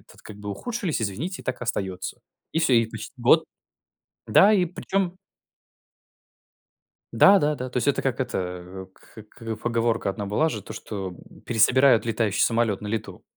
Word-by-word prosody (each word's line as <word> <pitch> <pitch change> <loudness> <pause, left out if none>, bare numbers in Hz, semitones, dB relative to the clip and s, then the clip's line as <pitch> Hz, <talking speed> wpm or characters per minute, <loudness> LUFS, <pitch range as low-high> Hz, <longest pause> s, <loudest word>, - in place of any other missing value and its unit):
тут - - -17
как 105 - -11
бы 105 0 -6
ухудшились. 200 - -3
Извините, 120 - -4
так 130 - -4
и - - -4
остается. 95 -5 -4 0.3
И - - 0
всё. 160 -6 +3
И 115 -1 +5
почти 110 +2 -9
год. 130 +7 +4 0.8
Да, 210 +2 +6
и 190 - +3
причем 185 +1 -2 2.0
Да-да-да. 150 -9 +4
То 125 - -4
есть 125 - -1
это 140 - +2
как 130 -3 -1
это 90 -5 -4
кх - - -22
к 115 -1 -6
поговорка 115 -1 0
одна 100 +1 -4
была 105 +11 +1
же, 105 -9 -5
то - - -9
что, 95 -3 -6
м, 90 - -15
пересобирают 120 +2 +4
летающий 110 -3 0
самолет 115 -4 +1
на 105 - -6
лету. 110 0 -5
115 Hz, 160 wpm, -25 LUFS, 105-145 Hz, 2.0 s, Да